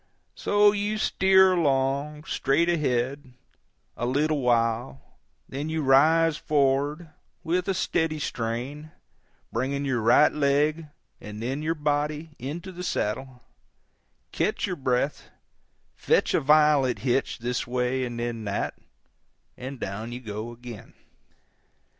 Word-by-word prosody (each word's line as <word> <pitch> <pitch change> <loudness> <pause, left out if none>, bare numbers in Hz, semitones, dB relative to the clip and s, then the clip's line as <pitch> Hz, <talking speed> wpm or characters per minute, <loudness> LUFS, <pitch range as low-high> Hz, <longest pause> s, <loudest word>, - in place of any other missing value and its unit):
So 205 0 +3
you 205 +1 -1
steer 190 -2 +4
along, 140 -1 0
straight 155 +2 +1
ahead, 135 -4 -1 0.6
a 120 - -2
little 145 +3 +1
while, 115 - +1 0.5
then 145 +4 -5
you 160 -1 -1
rise 155 +4 +4
forward, 145 +3 0 0.3
with 180 +3 0
a 195 - 0
steady 160 -3 0
strain, 130 +3 -4 0.6
bringing 140 +4 -2
your 130 -4 0
right 120 +7 +5
leg, 150 +2 +1 0.3
and 105 0 -9
then 130 +6 -3
your 160 +2 -1
body, 150 +1 -1
into 160 +9 -6
the 180 0 -8
saddle, 130 -4 -3 0.9
catch - - 0
your 180 - -3
breath, 130 0 -1 0.6
fetch - - +1
a - - +4
violent 150 -4 +4
hitch 130 +1 0
this 120 0 -3
way 125 +1 -1
and 120 -1 -4
then 120 -1 -3
that, 100 0 -3 0.8
and 130 +1 -7
down 105 +4 -5
you 120 - -5
go 110 -1 -6
again. 120 -2 -11
140 Hz, 125 wpm, -26 LUFS, 125-155 Hz, 0.9 s, right